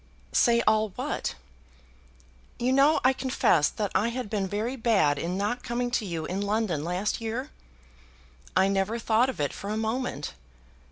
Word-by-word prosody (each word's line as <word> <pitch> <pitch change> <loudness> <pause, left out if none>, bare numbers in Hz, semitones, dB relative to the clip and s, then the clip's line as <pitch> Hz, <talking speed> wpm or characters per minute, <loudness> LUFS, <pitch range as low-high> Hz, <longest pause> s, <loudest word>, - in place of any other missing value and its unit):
"Say 235 -1 +4
all 215 0 +3
what?" - - -3 1.2
"You 250 +2 +1
know 280 +4 +5
I 260 +1 +5
confessed 255 - +2
that 205 -3 -1
I 215 - +2
had 235 -3 -4
been 200 -3 0
very 215 +6 -2
bad 200 - +2
in 175 +2 -2
not 210 +5 -1
coming 245 +1 -2
to 235 -3 0
you 165 -3 -3
in 185 +4 -3
London 205 -7 0
last 180 +7 -1
year." 230 +4 -4 1.0
"I 190 +1 +5
never 195 +3 0
thought 230 +2 +2
of 260 - -6
it 145 -1 0
for 200 - -6
a 215 - -1
moment." 220 - -2
220 Hz, 165 wpm, -27 LUFS, 195-240 Hz, 1.2 s, know